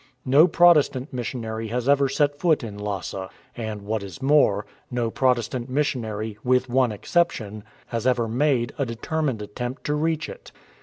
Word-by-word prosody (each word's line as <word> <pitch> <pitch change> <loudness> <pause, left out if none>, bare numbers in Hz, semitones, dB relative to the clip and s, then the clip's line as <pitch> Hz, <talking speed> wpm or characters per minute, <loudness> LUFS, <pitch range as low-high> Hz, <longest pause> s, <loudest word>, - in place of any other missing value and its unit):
No 140 +6 +6
Protestant 155 -6 +4
missionary 115 -3 -4
has 120 +3 -2
ever 140 -1 +4
set 145 0 +1
foot 160 -6 +2
in 105 -3 -6
Lhasa, 100 -2 -4 0.3
and 110 -3 -5
what 110 +1 -2
is 100 +6 -8
more, 135 -7 +3 0.2
no 120 -2 -1
Protestant 125 -1 0
missionary, 110 -6 -2
with 125 0 +2
one 125 -1 +2
exception, 110 - -1 0.3
has 115 +1 -2
ever 120 -2 +2
made 125 0 +1
a 140 - +1
determined 120 0 -2
attempt 120 +5 -6
to 150 - -1
reach 160 +1 0
it. - - -11
125 Hz, 155 wpm, -24 LUFS, 110-140 Hz, 0.3 s, No